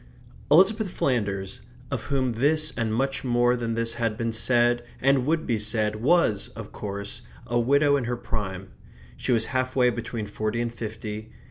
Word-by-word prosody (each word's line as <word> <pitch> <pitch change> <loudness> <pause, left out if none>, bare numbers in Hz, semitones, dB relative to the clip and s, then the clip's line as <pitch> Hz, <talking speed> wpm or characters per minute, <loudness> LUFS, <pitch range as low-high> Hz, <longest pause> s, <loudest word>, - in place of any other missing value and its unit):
Elizabeth 195 +7 +5
Flanders, 100 - -1 0.3
of 130 -5 -3
whom 130 -3 0
this 155 +6 +1
and 115 -2 -1
much 135 +5 -1
more 120 -1 +3
than 115 -2 -2
this 115 0 0
had 115 -2 -1
been 115 -1 -1
said 120 +1 +3 0.2
and 135 -1 +3
would 160 +1 +1
be 115 -3 0
said, 105 0 0
was, 120 - +2
of - - -8
course, 100 +3 -6 0.2
a 120 0 0
widow 140 +4 +4
in 130 - -2
her 120 +1 -2
prime. 95 -5 -4 0.5
She - - -2
was 115 -2 +3
half 130 0 0
way 125 -2 +4
between 115 -1 -4
forty 110 +2 -2
and 120 0 -2
fifty. 110 -1 -6
120 Hz, 170 wpm, -26 LUFS, 110-130 Hz, 0.5 s, Elizabeth